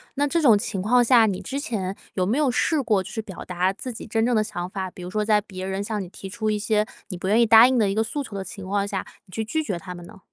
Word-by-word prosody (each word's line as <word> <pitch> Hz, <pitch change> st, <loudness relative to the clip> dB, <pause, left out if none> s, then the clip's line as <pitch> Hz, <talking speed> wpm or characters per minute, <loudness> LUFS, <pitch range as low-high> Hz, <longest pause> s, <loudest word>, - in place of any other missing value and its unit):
那 290 Hz, +1 st, +1 dB
这 335 Hz, +4 st, +1 dB
种 235 Hz, -8 st, +6 dB
情 200 Hz, -1 st, -3 dB
况 245 Hz, +5 st, +4 dB
下， 240 Hz, -1 st, +6 dB
你 195 Hz, -4 st, -1 dB
之 275 Hz, -, -5 dB
前 210 Hz, -10 st, -3 dB, 0.2 s
有 185 Hz, -, +1 dB
没 220 Hz, +8 st, +1 dB
有 295 Hz, -4 st, +2 dB
试 290 Hz, +5 st, +1 dB
过 215 Hz, -6 st, +2 dB
去 220 Hz, +4 st, -5 dB
表 200 Hz, -4 st, -9 dB
达 180 Hz, +1 st, 0 dB
自 245 Hz, +5 st, -7 dB
己 -, -, -8 dB
真 225 Hz, 0 st, 0 dB
正 245 Hz, 0 st, +2 dB
的 215 Hz, -, +3 dB
想 175 Hz, -4 st, -5 dB
法， 190 Hz, -1 st, -4 dB
比 180 Hz, -, -12 dB
如 180 Hz, -, -6 dB
说 210 Hz, +2 st, -1 dB
在 210 Hz, 0 st, +4 dB
别 190 Hz, -2 st, -7 dB
人 190 Hz, +1 st, -2 dB
向 210 Hz, 0 st, -3 dB
你 180 Hz, -, -10 dB
提 195 Hz, -, -9 dB
出 215 Hz, +2 st, -2 dB
一 210 Hz, -, -1 dB
些 210 Hz, 0 st, +1 dB, 0.2 s
你 190 Hz, -, -6 dB
不 185 Hz, +2 st, -3 dB
愿 215 Hz, +3 st, +4 dB
意 235 Hz, -, +6 dB
答 225 Hz, +1 st, +9 dB
应 255 Hz, -1 st, +3 dB
的 210 Hz, -3 st, +3 dB
一 195 Hz, -, -1 dB
个 220 Hz, -, +2 dB
诉 230 Hz, +6 st, -3 dB
求 225 Hz, -7 st, -8 dB
的 195 Hz, -, -3 dB
情 190 Hz, +1 st, -9 dB
况 200 Hz, +1 st, 0 dB
下， 200 Hz, -1 st, -3 dB, 0.2 s
你 -, -, -21 dB
去 220 Hz, +3 st, -3 dB
拒 315 Hz, +8 st, -1 dB
绝 195 Hz, -, -3 dB
他 180 Hz, 0 st, -8 dB
们 175 Hz, -1 st, -10 dB
呢？ 210 Hz, +2 st, -14 dB
210 Hz, 335 characters per minute, -24 LUFS, 190-230 Hz, 0.2 s, 答